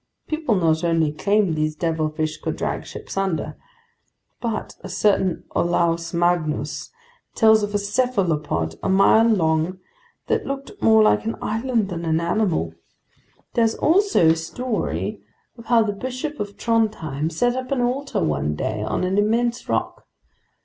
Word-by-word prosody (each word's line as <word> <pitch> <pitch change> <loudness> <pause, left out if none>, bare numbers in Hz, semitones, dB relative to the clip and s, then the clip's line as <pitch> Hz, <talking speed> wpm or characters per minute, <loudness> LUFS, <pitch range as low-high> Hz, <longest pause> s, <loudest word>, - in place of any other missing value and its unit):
People 310 -8 0
not 165 -3 +2
only 165 -3 +2
claimed 200 +2 +1
these 155 0 -1
devilfish 155 -1 -1
could - - -3
drag - - -3
ships - - -8
under, 195 -5 -1 0.9
but 230 -3 -3
a - - -7
certain 190 -2 +1
Olaus 170 -1 +1
Magnus 175 -3 0 0.5
tells 220 -1 +5
of 205 0 -3
a - - +5
cephalopod 185 - -1
a - - -1
mile 195 +4 +5
long 165 -4 +1 0.5
that - - 0
looked 275 0 -4
more 220 -1 +6
like 215 - +3
an 225 - -2
island 225 -2 -1
than 170 -2 -4
an 160 -1 +1
animal. 170 - 0 0.8
There's 225 -1 +2
also 370 - +3
the 160 - +5
story 220 +9 -3 0.3
of 230 - -13
how 235 -2 +4
the 205 -1 -2
Bishop 255 +7 -5
of 205 -1 -5
Trondheim 210 -11 0
set 245 +10 0
up 255 0 -5
an 270 -3 +1
altar 270 +3 -1
one 75 0 0
day 105 +7 -3
on 110 - -2
an 190 +2 +1
immense 235 +3 0
rock. - - -2
195 Hz, 150 wpm, -22 LUFS, 160-230 Hz, 0.9 s, more